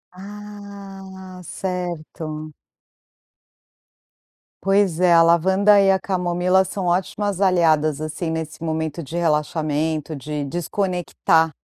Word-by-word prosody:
Ah, 195 -2 -10
certo. 160 -4 -5 2.1
Pois 195 -3 +2
é, 180 -1 +4
a 165 - +7
lavanda 190 +5 +5
e 195 0 +5
a 190 - +2
camomila 180 0 +1
são 190 0 -4
ótimas 190 +2 -1
aliadas, 160 -5 +3
assim, 155 +2 -4
nesse 160 0 -5
momento 160 0 -2
de 160 +4 -6
relaxamento, 155 -1 0
de 150 +1 -4
desconectar 175 0 0
175 Hz, 100 wpm, -22 LUFS, 160-190 Hz, 2.1 s, a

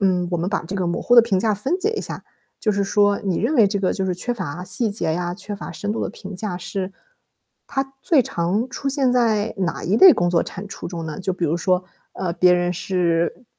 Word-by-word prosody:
嗯， 185 -2 +2
我 175 - 0
们 175 +2 -1
把 195 - -1
这 185 - -6
个 185 -2 -1
模 170 - -1
糊 245 - +3
的 235 - +10
评 200 -5 +1
价 215 +3 +2
分 265 - -1
解 415 +3 0
一 450 - -3
下， - - -5 0.3
就 215 - +1
是 200 0 0
说 205 0 +2
你 190 -4 -1
认 315 - 0
为 225 -7 +6
这 200 0 -1
个 190 - +1
就 190 - -2
是 180 - 0
缺 245 +7 -3
乏 180 -5 -5
细 210 +5 0
节 170 -6 -1
呀、 175 +1 -2
缺 205 +1 -6
乏 200 - -7
深 205 0 -3
度 - - -3
的 - - -2
评 195 0 -9
价 185 -1 -3
是， 185 +1 -4 0.8
它 270 -1 -3
最 300 -6 +4
常 190 +3 -1
出 275 - -3
现 270 -2 +2
在 225 -3 +1
哪 180 -4 -2
一 195 +5 +1
类 370 +6 +9
工 175 0 +1
作 170 -1 +3
产 195 +3 -7
出 195 - -7
中 170 -2 -5
呢？ 155 +2 -6
就 190 -1 -2
比 180 - -2
如 160 0 +1
说， 180 +1 +1 0.3
呃， 180 -3 -3
别 180 +1 +4
人 175 0 0
是 175 +4 -1
190 Hz, 270 characters per minute, -22 LUFS, 175-215 Hz, 0.8 s, 的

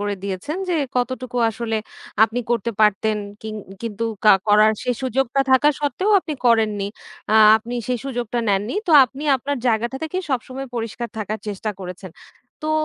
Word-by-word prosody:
করে 205 0 -1
দিয়েছেন 200 - -4
যে, 350 - +1 0.2
কতটুকু 250 0 -2
আসলে 225 0 -3 0.5
আপনি 230 +3 -3
করতে 235 -1 0
পারতেন 215 +1 +3 0.3
কিং 220 -1 -5 0.3
কিন্তু 230 0 -3 0.2
কা 215 - +8
করার 215 +1 +5
সেই 250 - 0
সুযোগটা 265 +1 0
থাকা 260 +3 +5
সত্ত্বেও 370 +8 0
আপনি 315 - -5
করেননি। 215 -4 +2 0.5
আ - - +4 0.2
আপনি 235 +2 -6
সেই 250 -1 0
সুযোগটা 245 -3 -3
নেননি। 200 - 0
তো 340 - 0
আপনি 270 +4 -9
আপনার 280 +3 -3
জায়গাটা 235 +3 0
থেকেই 365 +4 -3
সবসময় 260 +1 -3
পরিষ্কার 230 +1 -4
থাকার 215 +1 -3
চেষ্টা 210 +1 -3
করেছেন। 185 0 -8 0.5
তো 310 - 0
235 Hz, 160 wpm, -21 LUFS, 215-260 Hz, 0.5 s, কা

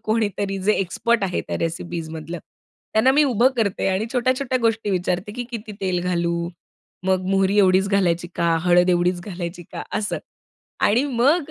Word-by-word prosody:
कोणीतरी 205 -3 -1
जे 210 +3 +3
एक्सपर्ट 220 +5 0
आहे, 180 -2 -1
त्या - - -1
रेसिपीजमधलं 165 0 -4 0.6
त्यांना 220 +5 +5
मी 295 +2 +5
उभं 250 -2 +4
करते 205 -4 0
आणि 190 +4 0
छोट्या-छोट्या 255 +1 +1
गोष्टी 225 -2 +1
विचारते, 180 +2 -1
की 245 +3 -4
"किती 225 -2 -6
तेल 185 -2 0
घालू? 170 -1 -1 0.6
मग 185 -1 +1
मोहरी 195 +1 +2
एवढीच 190 0 +4
घालायची 175 -3 +1
का? 170 -1 +2
हळद 180 0 +4
एवढीच 175 0 +1
घालायची 175 -2 -6
का?" - - -5 0.2
असं. 210 0 -2 0.6
आणि 240 +6 +3
मग 290 +6 +3
195 Hz, 155 wpm, -22 LUFS, 175-225 Hz, 0.6 s, त्यांना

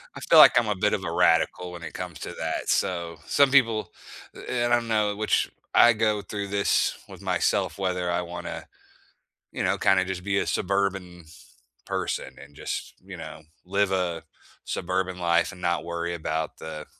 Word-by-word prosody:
I - - -7
feel - - +6
like 125 - +9
I'm 115 - -2
a 105 - 0
bit 105 +2 +1
of 95 - -1
a 85 - -3
radical 90 +1 +2
when 85 -1 -9
it 80 - -7
comes - - -7
to - - -6
that, - - -3
so, 85 -2 -1
some 140 +7 +4
people 115 -6 +3 0.4
eh, 120 -1 -3
and 120 - +1
I 120 - +5
know 105 -3 0
which 105 +1 0 0.2
I 120 - +7
go 105 -1 +1
through 100 +1 -5
this 100 0 +1
with - - -11
myself - - 0
whether 90 -2 -1
I 85 - 0
wanna, 90 0 -7 0.9
you - - -3
know, - - +1
kinda 95 -1 +3
just 95 -1 -5
be 100 0 0
a - - -2
suburban 95 -3 -1 0.6
person - - -3
and 70 0 -15
just, - - -5
you - - -9
know, 80 - -9 0.2
live 100 +1 +1
a 90 -3 -1 0.4
suburban 95 0 -2
life 85 0 +2
and 90 -2 -13
not 85 -1 0
worry 85 0 -3
about 80 -1 -3
the 80 -1 -7
95 Hz, 185 wpm, -26 LUFS, 85-100 Hz, 0.9 s, like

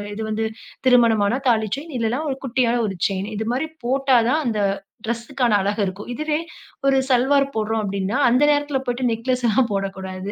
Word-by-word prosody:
இது 220 - -5
வந்து 220 +1 -1 0.4
திருமணமானா 230 -2 +4
தாலி 220 -2 +2
செயின் 305 0 -8
இல்லனா 230 +5 0
ஒரு 265 - -2
குட்டியான 245 -1 +1
ஒரு 190 - -5
செயின். 195 +1 -3
இதுமாதரி 245 +8 -2 0.2
போட்டா 265 +1 +3
தான் 310 +4 +2
அந்த 215 -3 0 0.4
ட்ரெஸ்ஸுக்கான 235 +1 -1
அழகு 205 +2 -1
இருக்கும். 190 +4 -6
இதுவே, 305 +3 -1 0.5
ஒரு 270 -1 +4
சல்வார் 270 +2 +3
போடுறோம் 220 0 -1
அப்டின்னா 200 +3 -2
அந்த 255 +4 +3
நேரத்தில 290 -1 +1
போய்ட்டு 245 +1 -2
நெக்லஸ்லாம் 240 +1 +1
போடக்கூடாது. 195 0 -4
235 Hz, 155 wpm, -22 LUFS, 210-265 Hz, 0.5 s, திருமணமானா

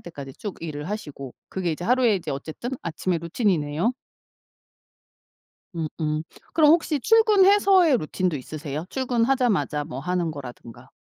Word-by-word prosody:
때까지 140 -5 -9
쭉 205 -3 -6
일을 150 -1 -5
하시고 145 - -6
그게 180 -3 -2
이제 165 +3 -6
하루에 245 -1 +3
이제 180 - -5
어쨌든 155 - -5
아침의 170 +1 -2
루틴이네요. 170 +1 0 1.8
음음 155 -1 -2 0.3
그럼 305 -2 +5
혹시 320 -3 +2
출근해서의 395 - +5
루틴도 175 0 -1
있으세요? 150 +2 -6
출근하자마자 245 - +1
뭐 135 -4 -7
하는 175 +1 -1
거라든가. 125 -3 -10
175 Hz, 325 characters per minute, -24 LUFS, 150-250 Hz, 1.8 s, 그럼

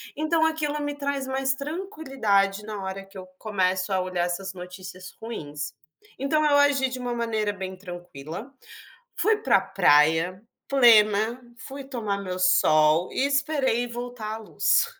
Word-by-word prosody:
Então 320 +2 +1
aquilo 300 -2 -1
me 290 0 -2
traz 280 -1 -2
mais 265 0 0
tranquilidade 270 - -1
na 205 -3 -5
hora 190 +1 -5
que 195 0 -14
eu 185 0 -9
começo 190 -2 0
a 190 - +2
olhar 180 -1 -1
essas 190 +2 -4
notícias 180 0 -9
ruins. 150 -10 -6 0.5
Então 305 +3 +1
eu 290 -1 +4
agi 285 -2 +4
de 255 0 -5
uma 245 -1 -3
maneira 220 -3 -1
bem 190 -1 -6
tranquila. 175 - -8 0.7
Fui 435 0 +3
para 430 - +3
a - - 0
praia, 160 +6 +3 0.3
plena, 225 -2 +5 0.2
fui 275 0 -7
tomar 225 -7 -3
meu 185 -1 -4
sol 155 -2 +4
e 270 - +1
esperei 275 -4 +1
voltar 240 -2 -6
a - - -5
luz 225 - +2
220 Hz, 150 wpm, -25 LUFS, 185-275 Hz, 0.7 s, plena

